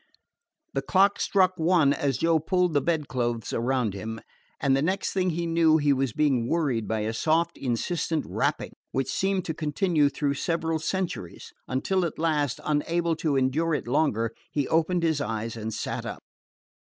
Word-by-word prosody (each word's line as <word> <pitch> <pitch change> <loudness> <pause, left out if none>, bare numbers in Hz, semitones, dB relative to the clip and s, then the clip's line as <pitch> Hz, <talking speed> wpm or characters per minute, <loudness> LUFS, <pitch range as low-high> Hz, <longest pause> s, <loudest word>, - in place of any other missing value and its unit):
The - - 0
clock 200 +1 +3
struck 185 -2 +3
one 160 -4 +4
as 140 -4 -1
Joe 165 +2 +3
pulled 180 +1 +1
the 145 - +3
bedclothes 125 -8 -1
around 120 -3 0
him; 110 +3 -5 0.4
and 135 -1 +3
the 135 - +1
next 185 +6 -1
he 180 -3 0
knew 165 -1 +4
he 145 -2 +3
was 135 -2 0
being 135 -4 +1
worried 140 -10 0
by 110 -1 -1
a 110 +1 -2
soft, 160 +7 +1
insistent 155 +5 -1
rapping, - - -1 0.2
which 135 - -1
seemed 190 -1 0
to 160 - -2
continue 155 0 +1
through 140 -1 -1
several 165 +2 -1
centuries, 170 - -4
until 180 +9 0
at 170 - -3
last, 150 -5 0
unable 165 +3 0
to 155 -3 0
endure 150 +5 +1
it 145 - -4
longer, 115 -5 +1 0.2
he 145 -3 -1
opened 165 +2 +1
his 160 -3 +1
eyes 115 -2 -3
and 110 0 -4
sat 110 - -4
up. - - -7
150 Hz, 165 wpm, -26 LUFS, 130-170 Hz, 0.4 s, one